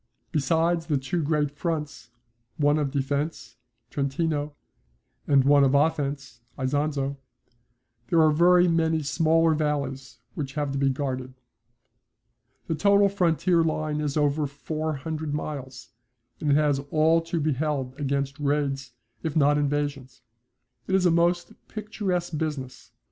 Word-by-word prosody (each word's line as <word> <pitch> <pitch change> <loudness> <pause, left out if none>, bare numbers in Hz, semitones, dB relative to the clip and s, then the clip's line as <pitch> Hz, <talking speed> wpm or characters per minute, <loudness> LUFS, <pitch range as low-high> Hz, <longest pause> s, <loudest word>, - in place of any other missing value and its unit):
Besides 165 +3 +1
the 150 -4 +1
two 135 +6 -2
great 150 -1 0
fronts, 150 -4 -4 0.5
one 145 0 +3
of 145 -2 0
defence 140 +3 -3 0.3
(Trentino) 145 +1 -1 0.7
and 140 -2 +5
one 140 +1 +5
of 135 0 +3
offence 140 -4 0 0.2
(Isonzo), 140 +1 -1 0.9
there 165 - +2
are 155 - +5
very 175 +3 +5
many 160 -2 +1
smaller 165 +2 +3
valleys 140 -4 -2 0.2
which 140 -2 -5
have 145 -2 -1
to 140 - -2
be 135 0 +3
guarded. 130 -2 -3 1.3
The - - -2
total 200 +4 +4
frontier 175 -2 +2
line 155 -1 -1
is 150 0 -2
over 145 0 +1
four 155 +3 -4
hundred 155 +1 -4
miles, 140 -3 -6 0.5
and 150 - -1
it 140 - +5
has 145 -2 +2
all 160 +2 +3
to 165 0 -3
be 155 0 +1
held 135 -2 -2
against 140 0 -2
raids 140 -3 -1 0.3
if 160 -3 -3
not 145 -1 +4
invasions. 145 -3 -2 0.6
It 190 - +1
is 190 -1 +2
a 175 - +5
most 175 +1 +1
picturesque 195 -6 -3
business. 135 -6 -5
150 Hz, 135 wpm, -26 LUFS, 140-160 Hz, 1.3 s, and